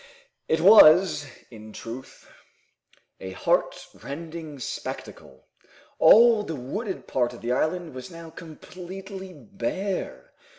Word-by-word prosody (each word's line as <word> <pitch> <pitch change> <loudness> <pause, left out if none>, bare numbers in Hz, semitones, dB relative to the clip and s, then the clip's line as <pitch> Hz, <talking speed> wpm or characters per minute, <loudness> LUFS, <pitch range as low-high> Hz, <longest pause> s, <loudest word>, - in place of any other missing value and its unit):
It 160 - +1
was, 180 -5 +7 0.2
in 110 -1 -12
truth, 120 +3 -10 0.9
a 95 0 -7
heart - - 0 0.2
rending 160 0 -8
spectacle. 65 - -8 0.5
All 230 -1 +7
the 165 -6 -5
wooded 190 - -5
part 125 -2 -1
of 120 - -12
the 120 - -3
island 160 +5 -1
was 130 +4 -9
now 165 -2 -11
completely 185 +4 -10
bare. 195 - -5
165 Hz, 110 wpm, -25 LUFS, 130-190 Hz, 0.9 s, was